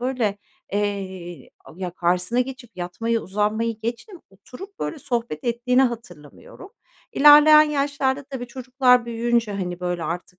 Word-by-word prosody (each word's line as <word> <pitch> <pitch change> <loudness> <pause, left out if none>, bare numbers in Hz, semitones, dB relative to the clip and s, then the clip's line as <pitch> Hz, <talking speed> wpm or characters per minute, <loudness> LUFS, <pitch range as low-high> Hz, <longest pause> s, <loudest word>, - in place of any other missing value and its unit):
böyle, 240 -5 -1 0.3
eee, 190 -6 -4
a - - -14
ya, 185 -1 -4
karşısına 180 +6 0
geçip 255 -2 -6
yatmayı, 225 +6 -2
uzanmayı 210 +3 -2
geçtim, 240 - -6
oturup, 380 - -13
böyle, 320 - -4
sohbet 235 - -4
ettiğini 245 +2 +2
hatırlamıyorum. 230 - -6 0.4
İlerleyen 300 +1 +8
yaşlarda 285 -2 -1
tabii 260 -2 -7
çocuklar 250 0 +2
büyüyünce, 235 -1 0
hani, 180 -3 -4
böyle, 180 -1 -3
artık, 180 +1 -6
235 Hz, 125 wpm, -22 LUFS, 190-265 Hz, 0.4 s, İlerleyen